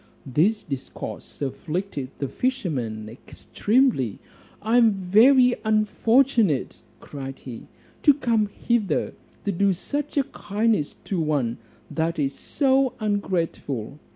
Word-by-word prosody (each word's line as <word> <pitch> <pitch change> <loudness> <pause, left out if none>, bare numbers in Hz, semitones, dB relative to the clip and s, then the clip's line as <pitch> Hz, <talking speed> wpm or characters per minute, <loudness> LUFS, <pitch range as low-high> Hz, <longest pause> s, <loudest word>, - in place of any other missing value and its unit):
This 175 - +1
discourse 140 +1 -7
afflicted 150 0 -4
the 140 - -2
fisherman 135 - -2
extremely: 140 - 0 0.4
"I 225 +3 +2
am 230 -3 +5
very 240 +7 +5
unfortunate," 220 - +2 0.2
cried 135 -2 -7
he, 120 -4 -10 0.3
"to 290 -3 +6
come 230 -6 +1
hither 205 -4 -1 0.3
to 200 - +1
do 195 +1 +2
such 290 - -4
a 280 - +4
kindness 215 - -1
to 190 - -2
one 145 -7 0 0.3
that 165 +1 -1
is 140 -2 0
so 270 -2 +1
ungrateful. 170 - -2
200 Hz, 110 wpm, -24 LUFS, 145-235 Hz, 0.4 s, to